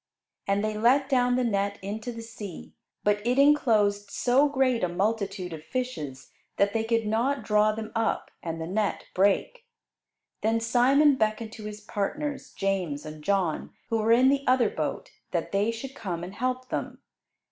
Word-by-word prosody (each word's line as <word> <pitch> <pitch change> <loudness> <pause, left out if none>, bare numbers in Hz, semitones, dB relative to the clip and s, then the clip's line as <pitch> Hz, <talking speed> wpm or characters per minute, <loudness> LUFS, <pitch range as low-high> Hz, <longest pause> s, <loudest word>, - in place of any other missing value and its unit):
And 200 +1 +1
they 215 0 -1
let 260 +6 +3
down 250 -2 +3
the 255 - +1
net 200 -3 0
into 215 +4 -4
the 230 -1 -8
sea, 215 -6 -9 0.3
but 205 0 +2
it 245 +3 +1
enclosed 215 -8 +3
so 265 +7 +3
great 260 -5 +1
a 180 - +2
multitude 195 -1 -1
of 155 -1 -8
fishes 160 - -5 0.3
that 200 0 +2
they 225 - +1
could 225 0 +1
not 235 +5 0
draw 210 0 +3
them 220 0 -6
up; 225 -1 -1
and 165 -1 -4
the 160 - -3
net 205 +4 -1
brake. 205 - +1 0.8
Then 225 +1 +2
Simon 260 +5 +4
beckoned 220 0 0
to 220 -2 -9
his 210 0 -7
partners, 275 +9 -3
James 185 -7 -2
and 155 0 -9
John, 190 -3 0 0.2
who 225 - +1
were 220 +1 +2
in 250 +3 +6
the 280 0 +2
other 255 -1 +4
boat, - - -3 0.2
that - - -2
they 200 +3 +1
should 230 +4 -5
come 185 -10 -5
and 180 +2 -7
help 255 +3 -2
them. - - -4
220 Hz, 175 wpm, -27 LUFS, 200-250 Hz, 0.8 s, in